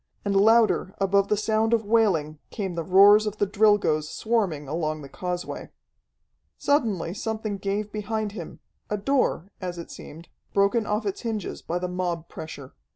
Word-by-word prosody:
And 200 -1 0
louder 220 -1 +4
above 200 0 +3
the 210 - +1
sound 220 +2 +2
of 225 -2 -3
wailing 185 -9 +2
came 195 -4 -4
the 170 - -2
roars 200 +4 +6
of 210 0 -4
the 205 - +2
Drilgoes 200 -7 +2
swarming 195 -11 -1
along 155 0 -2
the 140 - -10
causeway. 180 +2 -5 0.9
Suddenly 220 - 0
something 215 -2 -3
gave 205 +2 -2
behind 215 0 -3
him 180 -6 -9 0.3
a 210 - -1
door, 205 - 0
as 180 -1 -4
it 170 - -8
seemed, 165 +3 -11 0.3
broken 200 +3 +2
off 210 +1 -1
its 200 - -3
hinges 220 -5 -4
by 170 - -3
the 180 0 -2
mob 175 -2 -3
pressure. 140 -4 -9
200 Hz, 160 wpm, -25 LUFS, 175-215 Hz, 0.9 s, roars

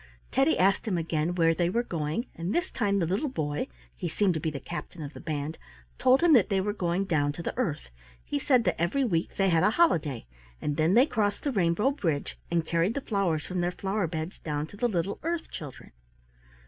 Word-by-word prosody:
Teddy 270 +5 +3
asked 195 +4 +2
him 190 -5 +1
again 165 +1 -1
where 165 -2 +4
they 170 +1 +1
were 235 +6 +1
going, 165 - -2
and 170 +5 -3
this 350 +2 0
time 200 -4 +1
the 180 - +2
little 200 - 0
boy 150 - -2 0.3
(he - - -4
seemed 200 -3 +2
to 160 - -2
be 160 - -1
the 145 -3 -5
captain 170 0 -7
of 145 0 -7
the - - -9
band) 155 0 -4 0.4
told 260 +2 +5
him 340 -2 +6
that 235 -8 +5
they 195 - +2
were 205 +2 -1
going 180 -1 0
down 145 -6 +1
to 170 +4 -7
the - - -3
earth. 160 - -2 0.3
He 145 - -2
said 250 - +3
that 175 -4 0
every 195 +12 +1
week 170 -9 0
they 195 -1 +3
had 165 -2 +3
a 190 - +5
holiday, 160 - +2 0.3
and 150 - -2
then 160 +6 +3
they 250 +3 +7
crossed 205 -7 -1
the 285 - 0
rainbow 195 +4 +2
bridge, 165 - -2
and 170 -1 +1
carried 170 +6 +1
the 280 - -1
flowers 190 - 0
from 180 -1 -2
their 175 0 0
flower 195 0 -1
beds 160 +2 -5
down 150 -1 -2
to 160 - -13
the 240 +4 +1
little 195 -2 -2
earth 335 0 -3
children. 145 -5 -9
175 Hz, 225 wpm, -28 LUFS, 160-210 Hz, 0.4 s, they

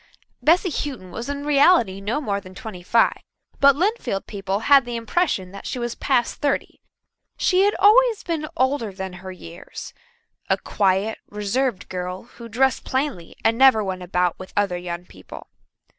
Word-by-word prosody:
Bessy 350 +3 +3
Houghton 255 -12 -4
was 235 +8 -6
in 285 0 -4
reality 280 - +4
no 215 +8 -1
more 200 -8 -2
than 185 0 -13
twenty 195 -3 -8
five, 230 +6 +2 0.4
but 280 -1 +6
Lynnfield 365 - -1
people 195 0 -3
had 275 +3 +6
the 240 0 -5
impression 230 - -1
that 200 - -9
she - - -3
was 240 -1 -3
past 250 -4 0
thirty. 285 -1 -1 0.6
She 375 +1 +3
had 410 - +2
always 455 +2 +5
been 320 -3 -3
older 260 -4 +1
than 190 -1 -6
her 190 0 -7
years 170 -1 -10 0.6
a - - +3
quiet, 200 +2 0
reserved 210 +3 -1
girl 180 0 -5
who 235 0 -12
dressed 260 +4 +1
plainly 260 - -3
and 225 +1 +3
never 265 -5 +6
went 190 -2 -4
about 180 -1 0
with 185 - -10
other 200 -3 +1
young 175 0 -5
people. - - -13
225 Hz, 165 wpm, -22 LUFS, 190-280 Hz, 0.6 s, but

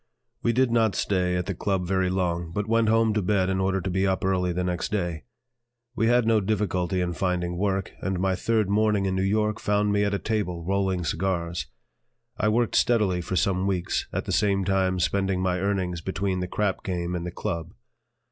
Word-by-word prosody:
We 115 - +2
did 125 +1 +2
not 115 -3 +2
stay 90 -2 0
at 90 0 -1
the 95 - -2
"Club" 95 0 -1
very 95 0 +1
long, 85 -2 -1
but 100 +4 -2
went 115 0 +2
home 115 -1 +3
to 105 - +1
bed 95 -1 +1
in 95 - 0
order 95 0 +1
to 95 - -3
be 95 +2 +1
up 95 0 0
early 90 -1 +1
the 90 +1 -1
next 90 0 -2
day. 85 -6 -2 0.7
We 115 - +2
had 120 0 +4
no 110 -1 +3
difficulty 95 -3 0
in 90 -1 -1
finding 90 -1 -1
work, 95 0 -1
and 95 -2 -2
my 95 0 +1
third 110 +2 +1
morning 105 0 +2
in 95 - 0
New 95 - 0
York 105 +2 +1
found 105 0 +1
me 100 0 +2
at 100 0 +1
a - - +1
table 100 -6 -2
rolling 95 -2 0
cigars. 85 0 -2 0.7
I 105 - +1
worked 115 +1 +1
steadily 105 -7 +2
for 90 +2 -4
some 95 +2 +1
weeks, 90 -3 -1
at - - -3
the - - -4
same 100 -2 +2
time 95 -1 +1
spending 95 +1 +1
my 90 -1 0
earnings 95 -3 -1
between 95 +1 -2
the 90 - -2
"crap" 100 +1 -1
game 90 -2 -2
and 85 -1 -3
the 90 - -3
"Club." 85 0 -4
95 Hz, 210 wpm, -26 LUFS, 90-105 Hz, 0.7 s, had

